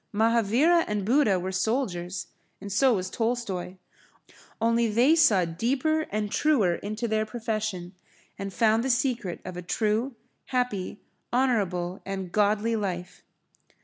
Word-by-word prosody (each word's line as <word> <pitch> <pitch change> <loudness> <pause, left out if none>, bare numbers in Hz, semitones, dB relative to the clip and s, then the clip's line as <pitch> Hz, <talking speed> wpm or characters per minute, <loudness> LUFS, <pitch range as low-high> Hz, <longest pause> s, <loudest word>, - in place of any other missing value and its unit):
Mahavira 230 +10 +3
and 210 -2 -2
Buddha 225 -5 +3
were 185 +1 -3
soldiers, 185 -4 -2 0.3
and 200 +1 -8
so 250 +4 +4
was 185 -1 -2
Tolstoy. 225 -5 -2 0.8
Only 230 +1 +2
they 240 +9 +4
saw 220 - +4
deeper 265 - 0
and 210 0 -2
truer 250 - +2
into 215 +6 -4
their 215 -1 +1
profession, 215 -5 -4 0.4
and 195 0 -5
found 220 +3 +2
the 265 - -1
secret 240 -7 0
of 185 -1 -6
a - - -4
true, 220 +7 -1 0.3
happy, 245 -7 -2 0.3
honourable 195 -8 0
and 190 -2 -5
godly 210 +3 +2
life. 185 -4 -4
215 Hz, 130 wpm, -26 LUFS, 190-240 Hz, 0.8 s, so